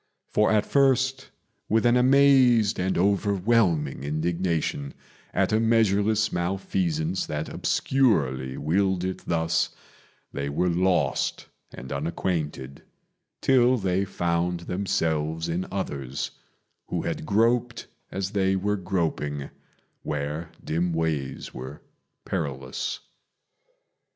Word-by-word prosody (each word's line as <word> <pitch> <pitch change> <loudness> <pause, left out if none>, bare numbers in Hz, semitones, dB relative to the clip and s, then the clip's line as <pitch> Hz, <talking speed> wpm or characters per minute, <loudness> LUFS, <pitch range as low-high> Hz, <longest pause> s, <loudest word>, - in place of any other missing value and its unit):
For 105 - +3
at 105 -1 +3
first, 135 -1 +2 0.4
with 110 +2 +2
an 120 0 +5
amazed 125 -5 +5
and 95 +1 0
overwhelming 95 - +2
indignation 80 -1 -1 0.4
At - - +1
a 110 - +4
measureless 110 -1 +2
malfeasance 85 -2 -1
that 75 +1 -3
obscurely 70 - +1
willed 95 +3 +1
it 95 0 -3
thus, 80 0 +1 0.6
They 70 0 -3
were 90 +6 +1
lost 90 +2 0 0.2
and 65 - -9
unacquainted 75 -3 -3 0.6
till 130 -1 +4
they 95 -2 0
found 85 -2 -1
themselves 80 -4 -1
in 85 +2 -2
others, 70 -9 -3 0.6
Who - - -2
had - - -3
groped 115 +3 +1 0.2
as 95 0 -3
they 95 -2 +1
were 105 +2 0
groping 80 -6 -2 0.5
where 75 +2 -3 0.2
dim 85 +2 0
ways 80 -5 -2
were 65 +3 -8 0.4
perilous. 70 -8 -3
90 Hz, 100 wpm, -26 LUFS, 80-105 Hz, 0.6 s, an